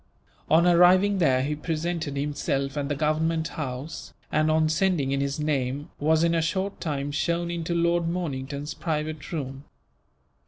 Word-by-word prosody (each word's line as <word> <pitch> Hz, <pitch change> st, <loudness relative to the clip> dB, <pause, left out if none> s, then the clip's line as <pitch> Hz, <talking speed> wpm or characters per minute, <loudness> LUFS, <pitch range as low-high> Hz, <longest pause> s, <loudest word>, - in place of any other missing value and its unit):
On 165 Hz, +2 st, +5 dB
arriving 185 Hz, +3 st, +5 dB
there 130 Hz, -6 st, +3 dB
he 150 Hz, +2 st, -1 dB
presented 160 Hz, -1 st, -3 dB
himself 140 Hz, -1 st, -1 dB
at 145 Hz, -1 st, -2 dB
the 145 Hz, -, 0 dB
Government 160 Hz, +2 st, 0 dB
House 135 Hz, +1 st, -6 dB, 0.2 s
and, 155 Hz, 0 st, +2 dB
on 155 Hz, 0 st, +3 dB
sending 160 Hz, -4 st, +1 dB
in 140 Hz, 0 st, 0 dB
his 140 Hz, +1 st, -2 dB
name, 145 Hz, -2 st, -1 dB
was 155 Hz, +2 st, +3 dB
in 170 Hz, 0 st, +3 dB
a 165 Hz, -, +2 dB
short 190 Hz, +5 st, -2 dB
time 145 Hz, -3 st, -2 dB
shown 170 Hz, +3 st, -1 dB
in 170 Hz, -1 st, -3 dB
to 170 Hz, -, -1 dB
Lord 170 Hz, 0 st, +2 dB
Mornington's 145 Hz, -4 st, -3 dB
private 155 Hz, -2 st, -3 dB
room. 135 Hz, -4 st, -4 dB
155 Hz, 160 wpm, -26 LUFS, 140-170 Hz, 0.2 s, On